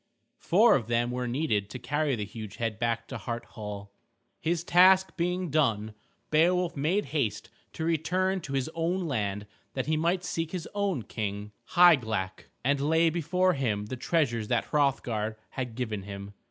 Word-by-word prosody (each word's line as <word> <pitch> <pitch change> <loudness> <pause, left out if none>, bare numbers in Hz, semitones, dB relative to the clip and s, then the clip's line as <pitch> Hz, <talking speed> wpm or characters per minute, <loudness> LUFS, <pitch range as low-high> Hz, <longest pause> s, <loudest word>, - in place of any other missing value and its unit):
Four 215 +7 +5
of 120 -5 +1
them 120 +1 +1
were 125 0 -2
needed 120 -6 0
to - - -6
carry 145 +1 0
the 105 -2 -3
huge 110 0 -8
head 115 -2 -3
back 115 -1 -1
to - - -5
Hart 120 -1 -4
Hall. 105 -3 -8 0.5
His 170 0 -1
task 185 +2 +5
being 180 -1 -1
done 110 -8 +1 0.4
Beowulf 175 +3 +3
made 165 +9 +1
haste 115 -9 -1 0.2
to 160 - -3
return 185 +4 +1
to 140 - -7
his 135 0 0
own 170 +3 0
land 105 -6 -2 0.3
that 130 - -1
he 155 0 +1
might 175 +3 +1
seek 165 -1 -3
his 180 -3 -4
own 200 - -1
King, 105 -1 -4 0.2
Hygelac, 110 - +4 0.2
and 140 +1 +2
lay 160 +3 +3
before 180 +3 +1
him 110 -8 -1
the 115 - -5
treasures 120 -5 0
that 120 0 +1
Hrothgar 120 -7 0
had 125 -3 -4
given 110 -5 -3
him. 100 +1 -8
135 Hz, 165 wpm, -28 LUFS, 110-170 Hz, 0.5 s, Four